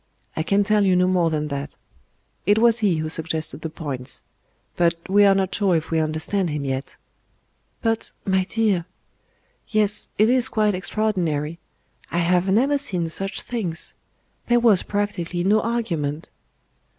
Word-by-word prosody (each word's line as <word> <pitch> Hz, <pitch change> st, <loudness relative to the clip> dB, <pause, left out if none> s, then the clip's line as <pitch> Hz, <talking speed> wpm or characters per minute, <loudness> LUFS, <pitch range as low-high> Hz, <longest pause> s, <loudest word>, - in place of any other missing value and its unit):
I -, -, -1 dB
can 200 Hz, +5 st, +2 dB
tell 210 Hz, 0 st, +2 dB
you 190 Hz, -2 st, +3 dB
no 180 Hz, 0 st, +4 dB
more 180 Hz, -2 st, +2 dB
than 150 Hz, -1 st, -2 dB
that. 140 Hz, -1 st, -5 dB, 0.7 s
It 205 Hz, +1 st, +5 dB
was 230 Hz, +1 st, +4 dB
He 200 Hz, -6 st, +2 dB
who 155 Hz, 0 st, -2 dB
suggested 160 Hz, -2 st, -2 dB
the 160 Hz, -, -4 dB
points. 140 Hz, -5 st, -4 dB, 0.5 s
But 170 Hz, -1 st, +2 dB
we 205 Hz, +2 st, +5 dB
are 195 Hz, -1 st, +5 dB
not 190 Hz, -1 st, 0 dB
sure 195 Hz, -4 st, +2 dB
if 160 Hz, 0 st, -2 dB
we 165 Hz, -, +2 dB
understand 160 Hz, +4 st, -1 dB
Him 150 Hz, -2 st, -3 dB
yet." 135 Hz, 0 st, -4 dB, 0.9 s
"But, 225 Hz, -1 st, -1 dB
my 190 Hz, -1 st, +2 dB
dear 200 Hz, -5 st, 0 dB, 0.4 s
" -, -, -42 dB
"Yes; 210 Hz, -1 st, +2 dB
it 215 Hz, -, +5 dB
is 255 Hz, +1 st, +3 dB
quite 210 Hz, -2 st, +1 dB
extraordinary. 175 Hz, -6 st, -1 dB, 0.5 s
I 170 Hz, -, -3 dB
have 175 Hz, +2 st, +2 dB
never 270 Hz, +8 st, +3 dB
seen 180 Hz, -, 0 dB
such 195 Hz, +4 st, -4 dB
things. 185 Hz, -9 st, -2 dB, 0.5 s
There 240 Hz, 0 st, +4 dB
was 225 Hz, -6 st, +5 dB
practically 195 Hz, -4 st, -2 dB
no 210 Hz, +3 st, +3 dB
argument." 165 Hz, -11 st, -2 dB
185 Hz, 160 wpm, -22 LUFS, 160-210 Hz, 0.9 s, It